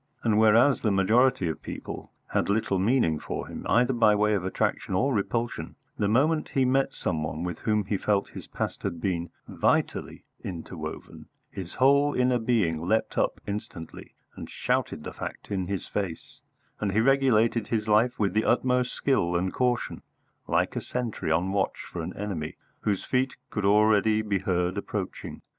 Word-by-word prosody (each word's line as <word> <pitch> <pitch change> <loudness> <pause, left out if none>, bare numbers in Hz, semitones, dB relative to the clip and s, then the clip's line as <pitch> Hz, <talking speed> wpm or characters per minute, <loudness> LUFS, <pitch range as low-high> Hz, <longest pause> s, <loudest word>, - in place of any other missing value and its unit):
And 110 -2 +3
whereas 115 +5 +5
the 110 - +2
majority 105 +1 +3
of 80 -3 -4
people - - -7 0.2
had - - +1
little 100 -2 +1
meaning 95 - +2
for - - -5
him, - - -7
either 120 +4 +3
by 110 -3 +4
way 105 +1 +2
of 100 -3 0
attraction 95 0 -1
or 130 +9 +2
repulsion, 115 +3 -2 0.2
the 100 - 0
moment 150 +9 +2
he 135 -1 +2
met 135 +1 +1
some 80 -4 -2
one 75 +2 -3
with 90 -2 -4
whom 105 -2 0
he 100 +1 -1
felt 100 +1 0
his - - -9
past - - -4
had 85 - -3
been 85 -2 -2 0.2
vitally - - 0 0.2
interwoven 85 -4 -7 0.2
his 95 -2 -7
whole 140 +2 +4
inner 125 -1 +2
being 105 -9 +1
leapt 110 +6 0
up - - 0
instantly 100 -5 -7 0.2
and - - -8
shouted - - -1
the - - -6
fact - - -7
in 95 -3 -1
his 100 -1 -3
face, 95 -6 -5 0.4
and 100 -2 -1
he 110 - +3
regulated 115 -4 +3
his 110 -2 -1
life 110 +4 +3
with 100 -2 +1
the 110 +1 +2
utmost 125 -1 +2
skill 90 -11 +1
and 90 +2 0
caution, 125 -2 0 0.5
like - - +1
a - - -1
sentry 120 -9 -3
on 85 +4 +1
watch 95 -1 0
for - - -4
an - - -6
enemy 95 -7 -4 0.2
whose 100 -3 -1
feet 130 0 0 0.2
could 105 -2 -2
already 105 +1 +4
be 100 -2 0
heard 90 0 0
approaching. 100 -2 -5
105 Hz, 175 wpm, -27 LUFS, 95-120 Hz, 0.5 s, whereas